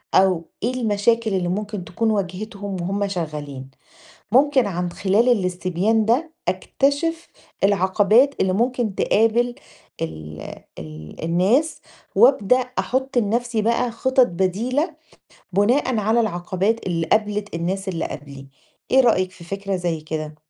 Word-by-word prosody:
أو 185 -3 +3
إيه 245 +3 0
المشاكل 225 -1 +1
اللي 180 -2 0
ممكن 205 0 -3
تكون 225 +4 0
واجهتهم 200 0 -4
وهُم 200 +3 -1
شغالين 150 -7 -5 0.6
ممكن 270 -2 +4
عن 180 -2 -2
خلال 205 +5 +2
الاستبيان 185 0 +1
ده 290 +9 +1 0.2
أكتشف 285 - 0 0.4
العقبات 205 +7 +4
اللي 190 - +2
ممكن 235 0 0
تقابل 235 +4 +2 0.5
ال 80 -1 -6 0.4
ال 75 - -9
الناس 200 - +2 0.4
وابدأ 245 +1 +5
أحط 255 +1 -1
لنفسي 230 +1 0
بقى 235 +2 +1
خطط 260 +2 +3
بديلة 215 - -1 0.6
بُناءً 235 +5 +2
على 220 +3 +2
العقبات 195 +1 -1
اللي 165 -2 -1
قابلِت 210 0 0
الناس 190 +3 -2
اللي 170 -3 -2
قَبلي، 140 -1 -8 0.4
إيه 265 - +6
رأيِك 185 -7 +2
في 170 - -14
فكرة 195 +2 -3
زي 175 -3 -2
كده؟ 155 0 -5
205 Hz, 125 wpm, -22 LUFS, 180-235 Hz, 0.6 s, إيه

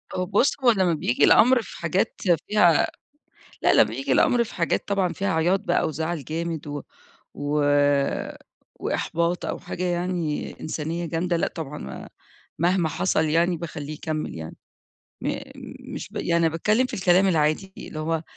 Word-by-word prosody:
هو 185 - -1
بُصّ، 205 +8 +2
هو 240 - +7
لما 185 -5 +2
بييجي 125 -5 0
الأمر 250 +1 +6
في - - -11
حاجات 180 +6 -1 0.3
فيها 180 -7 +4 0.7
لا - - +4
لا - - +7
بييجي - - -3
الأمر 245 -3 +4
في 220 - -10
حاجات 170 -1 0
طبعًا 195 -3 0
فيها 195 -1 -1
عياط 175 +4 +2
بقى 175 -4 +1
وزعل 160 0 -3
جامد 160 -1 -4
و 145 -1 -4 0.5
و 145 +1 -1 1.2
وإحباط 170 +1 -1
أو - - -3
حاجة 180 - -5
يعني 175 -3 -2
إنسانية 160 +2 -3
جامدة، 170 +1 -1
لأ - - +1
طبعًا 150 - -7 0.5
مهما 175 -1 +2
حصل 160 0 +1
يعني 170 +3 +2
باخليه 155 -2 -6
يكمّل 155 - -4
يعني 80 0 -7 0.7
م - - -2 0.6
مش - - -6
ب - - -13
يعني 170 -1 +2
باتكلم 210 +10 +1
في - - -7
الكلام 190 0 +4
العادي 160 +3 +1
اللي 155 - -8
هو 160 0 -1
170 Hz, 155 wpm, -24 LUFS, 155-185 Hz, 1.2 s, هو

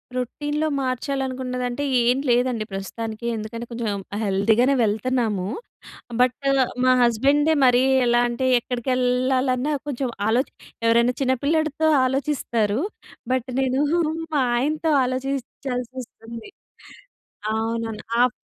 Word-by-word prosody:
రొటీన్‌లో 295 +5 -2
మార్చాలనుకున్నదంటే, 255 -1 -2 0.2
ఏం 245 +2 +3
లేదండి 240 -2 +2
ప్రస్తుతానికి. 220 +4 -5
ఎందుకంటే 225 +2 -6
కొంచెం 230 -2 -3 0.3
హెల్తీ 200 +2 +2
గానే 265 +3 +4
వెళ్తన్నాము. 215 -2 0 0.7
బట్ 250 0 +3 0.5
మా 255 - +5
హస్బెండే 280 +7 +3
మరి 250 0 +5 0.2
ఎలా 240 0 +4
అంటే, 240 +2 -2
ఎక్కడికెళ్ళాలన్న 255 +2 0
కొంచెం 265 -2 -2 0.2
ఆలో 240 +4 +3 0.4
ఎవరైనా 235 +2 +4
చిన్నపిల్లాడితో 305 +4 +1 0.2
ఆలోచిస్తారు. 255 -5 0 0.5
బట్ 260 0 -1
నేను 265 0 +1 0.5
మా 285 - +3 0.2
ఆయనతో 305 +5 0
ఆలోచించాల్సొస్తుంది. 255 - -5 1.1
అవును. 225 +1 -2 0.3
ఆప్ 250 -1 +4
250 Hz, 95 wpm, -23 LUFS, 235-265 Hz, 1.1 s, మా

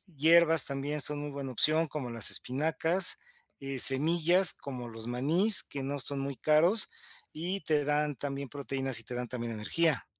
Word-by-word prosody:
hierbas 165 0 +5
también 140 +2 -5
son 150 +1 +3
muy 145 0 -8
buena 140 -2 -9
opción, 155 +6 0
como 135 -4 -8
las 115 -1 +2
espinacas, 160 +6 0 0.4
eh, 135 -1 -7
semillas, 165 +7 +4
como 125 -3 -10
los 115 -1 -11
manís, 160 - +3
que 140 -1 -9
no 140 +1 -6
son 140 +1 +2
muy 135 0 -7
caros, 160 - +2 0.4
y 180 +5 -6
te 150 -2 -2
dan 150 0 -3
también 140 -1 -8
proteínas 135 -3 -3
y - - -8
te 125 - -11
dan 125 0 -6
también 120 -1 -7
energía. 145 +7 -2
145 Hz, 170 wpm, -27 LUFS, 130-160 Hz, 0.4 s, hierbas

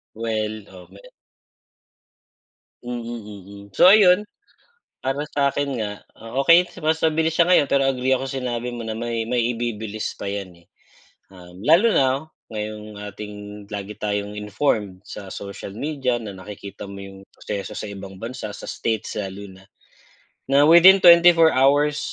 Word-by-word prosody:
Well, 110 -1 -3
oh, 90 -2 -14
me 100 +1 -16 1.8
Mm, 120 -1 -5
mm. 105 -4 -9
So 185 - +7
ayun, 200 -2 +6 0.8
para 135 +3 -2
sa'kin 140 -3 0
nga, 105 -1 -6
oh, 120 +5 -3
okey 175 +3 +6 0.2
mas 160 +1 +1
mabilis 160 0 +1
siya 170 +2 +3
ngayon, 165 -5 +5
pero 135 -1 +2
agree 130 0 0
ako 135 +1 -2
sinabi 125 -3 -3
mo 120 -2 -6
na 110 - -3
may 115 0 -3
may 120 +1 0 0.2
ibibilis 110 -2 -4
pa 100 - -6
'yan 100 -3 -5
,eh. 85 0 -23 0.7
Um, 90 +1 -14
lalo 170 - +5
na 135 +3 +1 0.2
ngayong 105 -1 -6
ating 105 0 -8 0.4
lagi 100 0 -5
tayong 105 0 -3
informed 105 -2 -2
sa 100 -2 -9
social 100 0 -8
media 130 0 -2
na 100 -4 -8
nakikita 100 +1 -9
mo 100 0 -9
'yung 95 0 -10
proseso 100 -2 -6
sa 105 - -6
ibang 95 -1 -10
bansa, 115 -2 -6
sa - - -10
states 110 -2 -3
lalo 100 0 -6
na, 95 - -18 0.8
na 140 +2 +4
within 175 +5 +7
24 170 -1 +7
hours, 145 +2 +3
115 Hz, 150 wpm, -22 LUFS, 100-140 Hz, 1.8 s, So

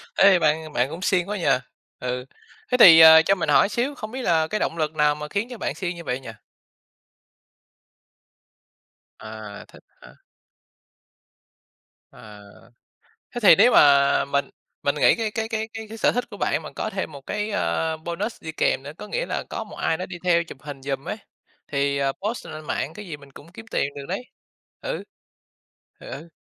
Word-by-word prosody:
Ê, 195 -2 +6
bạn 155 -1 0
bạn 125 +2 +1
cũng 165 +4 -8
siêng 185 -1 +1
quá 210 - -2
nhỉ, 175 - -4 0.5
ừ. 125 0 -4 0.5
Thế 250 - +3
thì, 165 -9 +10
ờ, 160 0 +10
cho 195 +5 +2
mình 185 - -3
hỏi - - +5
xíu, 255 +6 -2
không 215 -4 -7
biết 260 +2 -5
là 160 -7 +2
cái 215 - -2
động 165 - -2
lực 155 -1 -2
nào 150 -1 +3
mà 150 0 -7
khiến 205 +8 -2
cho 245 - -8
bạn - - -3
siêng 180 -2 -4
như 170 - -9
vậy 125 -4 -3
nhỉ? 130 - -10 2.9
À, 110 -2 -9
thích - - -18 0.2
hả? - - -15 2.0
À, 105 -1 -13 0.9
thế 240 - -4
thì 205 - +8
nếu 230 +5 +5
mà 140 -5 +5
mình 140 0 -1 0.3
mình 140 - +1
nghĩ 150 - +4
cái 225 -2 -2
cái 220 0 -3
cái 220 -1 -2
cái 225 0 -7
cái 225 - -8
sở - - +3
thích 245 - -1
của 205 - -10
bạn 155 - 0
mà 155 - -7
có - - -3
thêm 190 -5 -4
một 140 -2 -10
cái, 210 +9 -4
a, 160 - -1
bonus 170 +8 -5
đi 160 - -5
kèm 135 - 0
nữa, 145 - -7
có - - -9
nghĩa - - -2
là - - -3
có - - -4
một - - -12
ai 160 - -1
đó 185 - -4
đi 180 -1 -8
theo 170 -2 +3
chụp 165 - -12
hình 145 -2 -9
giùm 135 0 -4
ấy - - -3 0.5
thì, 140 0 0
à, 140 -1 +1
post 215 - -5
lên 155 -1 -9
mạng 150 +1 -3
cái 210 +4 -9
gì 155 -4 -6
mình 140 -1 -17
cũng 155 +4 -15
kiếm 225 - -11
tiền - - +1
được 140 -1 -7
đấy, 195 +7 -4 0.6
ừ. - - -4 1.0
Ừ, - - -12
ừ. 160 +5 -9
160 Hz, 200 wpm, -23 LUFS, 140-210 Hz, 2.9 s, thì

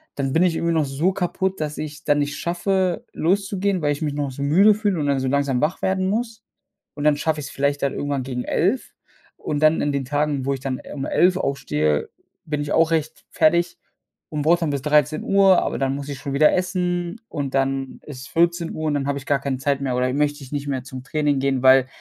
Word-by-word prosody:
dann 135 -1 -2
bin 165 - +3
ich 170 -3 +2
irgendwie 170 0 0
noch 155 -2 +2
so 145 +7 0
kaputt, 190 -1 -2
dass 150 -1 -3
ich 150 -1 -5
es - - -16
dann 145 0 +3
nicht 145 0 -2
schaffe, 180 +1 -1
loszugehen, 195 +1 0
weil 145 - +2
ich 145 - -8
mich 150 -2 -1
noch 145 -2 -2
so 135 - -8
müde 195 +9 +5
fühle 205 -5 0
und 145 - -1
dann 140 -1 +1
so 130 - -2
langsam 140 -2 +1
wach 155 +4 -1
werden 190 0 +1
muss. 225 0 -3 0.5
Und 145 - -5
dann 150 -1 +4
schaffe 155 0 -1
ich 140 - -6
es - - -10
vielleicht 140 0 -1
dann 140 - +1
irgendwann 140 -2 -2
gegen 125 -1 -4
11 - - 0 0.4
und 150 0 -3
dann 155 +1 +4
in 145 - 0
den 140 -2 -2
Tagen, 145 -1 -1
wo 140 - +2
ich 135 - -4
dann, 130 -2 -3
äh, - - -12
um 135 -1 -4
11 180 +1 +3
aufstehe, 75 - -1 0.4
bin 150 -1 -2
ich 145 - -4
auch 165 0 +4
recht 160 -1 -2
fertig. 170 +2 +2 0.5
Und 150 - -2
brauche 170 +2 +4
dann 160 -4 -1
bis 140 -2 -2
13:00, 155 +7 +3
aber - - -2
dann 135 0 0
muss 140 0 -6
ich 140 - -5
schon 140 0 -5
wieder 150 +2 +5
essen 180 +1 -1
und 140 -3 -4
dann 135 0 -1
ist 130 -4 -9
es 140 - -9
14:00 170 0 0
und 145 - 0
dann 140 -1 -1
habe 140 0 -1
ich 135 - -13
gar 140 -1 +1
keine 140 -1 -2
Zeit 140 +1 0
mehr 130 -2 -1
oder 125 0 +1
möchte 145 0 0
ich 130 - -13
nicht 145 -1 -3
mehr 130 -3 -2
zum 130 -1 -8
Training 145 -1 0
gehen, 135 -1 0
weil 130 0 +6
145 Hz, 245 wpm, -22 LUFS, 140-170 Hz, 0.5 s, weil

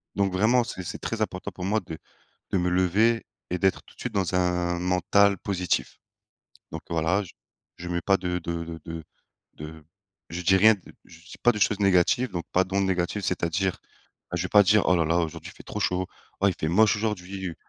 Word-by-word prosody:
Donc 100 -1 +1
vraiment 115 +6 +3
c'est 105 -6 -6
c'est - - -6
très 115 -1 -4
important 95 -3 -3
pour 90 - -6
moi 110 +3 +1
de 80 -3 -8 0.5
de 95 - +1
me 90 0 +1
lever 100 +6 +2 0.2
et 90 - -1
d'être 95 +1 +1
tout - - -19
de - - -17
suite - - -4
dans 95 -2 0
un 90 -1 +1
mental 90 +2 +3
positif. 90 -2 -2 0.7
Donc 80 - -6
voilà 85 +5 +1
je 95 - -11 0.4
je 90 - -7
mets 85 0 -1
pas 95 +3 +3
de 90 -2 -2
de 85 -1 -4
de 80 0 -7
de 80 -1 -6 0.5
de 75 0 -10 0.5
je 85 +2 -4
dis 95 +2 +4
rien 110 +3 +7
de 100 - -14 0.2
je 80 - -16
dis 85 - -13
pas 120 - +5
de 105 - -5
choses 105 0 +2
négative 100 +6 +3
donc 85 -2 -4
pas 95 +1 +3
d'ondes 95 +1 0
négative 95 +2 -1
c'est-à-dire, 90 +1 -1 0.6
je 90 - -1
vais 90 - -4
pas 105 -1 +7
dire: 105 +2 +4
«Oh 90 - +5
là 85 -2 +2
là, 85 +2 +1
aujourd'hui 80 -2 -4
il - - -29
fait - - -12
trop - - -6
chaud, 90 0 0 0.3
oh 100 - +5
il - - -1
fait 80 - -1
moche 105 +4 +4
aujourd'hui 95 -4 -4
90 Hz, 215 wpm, -26 LUFS, 85-100 Hz, 0.7 s, rien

